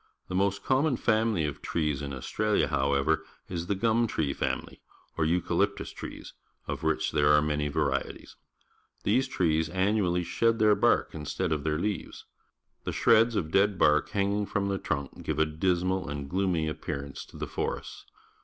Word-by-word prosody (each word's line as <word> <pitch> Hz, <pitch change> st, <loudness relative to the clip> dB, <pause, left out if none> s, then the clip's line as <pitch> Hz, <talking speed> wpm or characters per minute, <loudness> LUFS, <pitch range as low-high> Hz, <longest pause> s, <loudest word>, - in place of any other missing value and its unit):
The -, -, -5 dB
most 100 Hz, +1 st, +1 dB
common 135 Hz, 0 st, +2 dB
family 110 Hz, -7 st, +1 dB
of 75 Hz, -2 st, -4 dB
trees 75 Hz, -4 st, -1 dB
in 70 Hz, -1 st, -4 dB
Australia, 65 Hz, -2 st, 0 dB
however, 70 Hz, +3 st, +1 dB, 0.2 s
is 85 Hz, -1 st, -4 dB
the 100 Hz, -, 0 dB
gum 115 Hz, +3 st, +2 dB
tree 75 Hz, -9 st, -1 dB
family, -, -, -3 dB, 0.3 s
or 80 Hz, -, +1 dB
eucalyi^tus 90 Hz, +4 st, 0 dB
trees, -, -, -8 dB, 0.3 s
of -, -, -3 dB
which 80 Hz, 0 st, 0 dB
there 75 Hz, -1 st, +3 dB
are 75 Hz, -, +6 dB
man}' 75 Hz, -1 st, -1 dB
varieties. 70 Hz, -3 st, -2 dB, 0.7 s
These 125 Hz, +6 st, +2 dB
trees 80 Hz, -8 st, +1 dB
annually 95 Hz, -1 st, +1 dB
sjied_jjieir— 110 Hz, +3 st, +2 dB
bark -, -, +3 dB
.iiistead_ 80 Hz, +3 st, -3 dB
of 75 Hz, -2 st, 0 dB
their 75 Hz, -1 st, 0 dB
^lga^'es. 100 Hz, +4 st, -3 dB, 0.6 s
The -, -, -3 dB
shreds 115 Hz, +1 st, +4 dB
of 80 Hz, -6 st, -1 dB
dead 100 Hz, +1 st, +3 dB
bark 75 Hz, -2 st, +3 dB
hang 100 Hz, 0 st, 0 dB
ing 105 Hz, 0 st, 0 dB
from 100 Hz, -1 st, -1 dB
the 100 Hz, -1 st, -1 dB
trunk 70 Hz, -2 st, -3 dB
give 80 Hz, -, -3 dB
a 80 Hz, -, +4 dB
dismal 90 Hz, +2 st, 0 dB
and 70 Hz, -1 st, -4 dB
gloomy 90 Hz, -2 st, 0 dB
appearance 70 Hz, -2 st, -5 dB
to -, -, -14 dB
the -, -, -3 dB
forests. -, -, -5 dB
85 Hz, 165 wpm, -28 LUFS, 75-100 Hz, 0.7 s, are